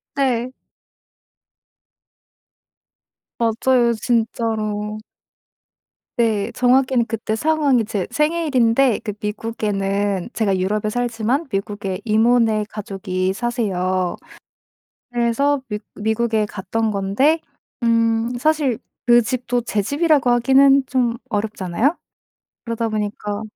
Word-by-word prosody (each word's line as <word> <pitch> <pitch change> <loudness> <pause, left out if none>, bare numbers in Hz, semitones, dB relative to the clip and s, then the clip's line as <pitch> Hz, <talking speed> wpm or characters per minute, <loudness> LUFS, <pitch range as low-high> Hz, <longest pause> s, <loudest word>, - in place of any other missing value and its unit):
네. 255 -3 0 2.9
맞아요 235 +1 +2
진짜로. 215 -2 -1 1.2
네. 220 -4 +1
정확히는 255 -1 +3
그때 225 -2 -3
상황이 285 -3 +2
제 205 -4 -2
생일인데 275 -6 +2
그 210 - -5
미국에는 205 -2 -2
제가 200 -4 +1
유럽에 210 +3 -1
살지만 245 +5 -1
미국에 195 -1 -3
이모네 220 -1 +3
가족이 190 -2 -3
사세요. 185 -6 -1 1.0
그래서 245 +4 +1
미 210 - -3 0.2
미국에 220 +1 0
갔던 210 +3 -2
건데 210 +11 +1 0.4
음 230 0 +2
사실 290 -4 +1 0.3
그 240 0 +6
집도 245 +1 -1
제 215 -3 -1
집이라고 290 - +2
하기는 270 +3 +5
좀 245 -3 0
어렵잖아요. 215 - -1 0.7
그러다 230 -1 -2
보니까 210 -1 -3
230 Hz, 215 characters per minute, -20 LUFS, 210-250 Hz, 2.9 s, 그